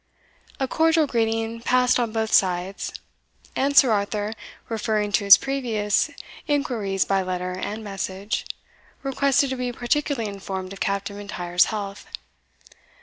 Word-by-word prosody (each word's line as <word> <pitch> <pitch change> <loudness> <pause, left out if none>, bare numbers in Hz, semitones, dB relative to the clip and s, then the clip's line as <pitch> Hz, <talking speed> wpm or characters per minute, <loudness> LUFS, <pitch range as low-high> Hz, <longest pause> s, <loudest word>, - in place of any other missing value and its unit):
A 265 - 0
cordial 320 +2 +3
greeting 225 -2 -1
passed 250 +1 +3
on 235 -2 0
both 220 0 -1
sides. 185 0 +1 0.6
And 280 +1 +1
Sir 260 -4 +8
Arthur, 205 0 -1 0.3
referring 215 -2 -1
to 205 0 +1
his 200 -1 +10
previous 230 -7 0 0.4
inquiries 225 -10 0
by 195 -1 +1
letter 180 0 -3
and 205 +4 -5
message, 195 0 -4 0.6
requested 275 0 +2
to - - -1
be 250 0 -2
particularly 245 0 -1
informed 195 -1 -5
of 195 - -11
Captain 200 0 -2
M'Intyre's 180 -4 +1
health. 200 -2 -5
215 Hz, 130 wpm, -24 LUFS, 195-250 Hz, 0.6 s, his